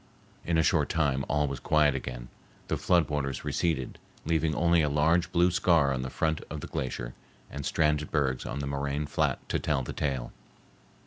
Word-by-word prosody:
In 85 -1 0
a 80 - +4
short - - +2
time 70 -4 +1
all 75 0 +2
was 70 -2 -4
quiet 75 0 +3
again; 60 -2 -6 0.4
the - - +1
flood 85 -3 +3
waters 70 -3 -3
receded, 80 -7 -1 0.3
leaving 80 -1 +1
only 85 0 +3
a 75 - +1
large 85 +4 +2
blue 90 0 +3
scar 85 -6 +3
on 65 - -2
the 65 - -4
front 80 +3 -1
of 75 -1 -5
the - - -5
glacier - - -4 0.4
and 70 - -5
stranded 75 0 +1
bergs 65 -4 0
on 70 - -4
the - - -3
moraine 70 +1 -2
flat - - -1
to - - 0
tell 70 -4 0
the - - -6
tale. 65 -5 -2
75 Hz, 190 wpm, -28 LUFS, 70-80 Hz, 0.4 s, a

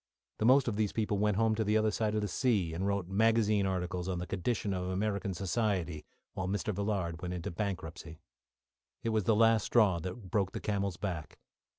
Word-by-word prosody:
The 110 - +1
most 130 +2 +5
of 105 -3 -1
these 105 -2 0
people 105 -2 0
went 105 -1 +2
home 110 0 +3
to 110 0 0
the 105 +1 +2
other 110 0 +2
side 110 0 0
of 105 - +1
the 105 - -1
sea, 100 -7 +1
and 95 +4 -2
wrote 100 -3 -1
magazine 105 0 +3
articles 90 -1 -2
on 90 - -1
the 90 - -3
conditions 100 +2 -1
of 90 -1 -2
American 100 0 -1
society, 90 -5 -1 0.3
while 95 - -3
Mr. 100 +2 -1
Villard 95 -4 -2
went 90 -1 -3
into 85 -1 -4
bankruptcy. 85 -4 -5 0.8
It 115 - 0
was 110 -3 +1
the 110 - +4
last 115 -1 +4
straw 105 -7 +4
that 95 +3 -7
broke 95 -3 +1
the - - -3
camel's 100 -3 -1
back. 90 -6 -5
100 Hz, 205 wpm, -32 LUFS, 90-110 Hz, 0.8 s, most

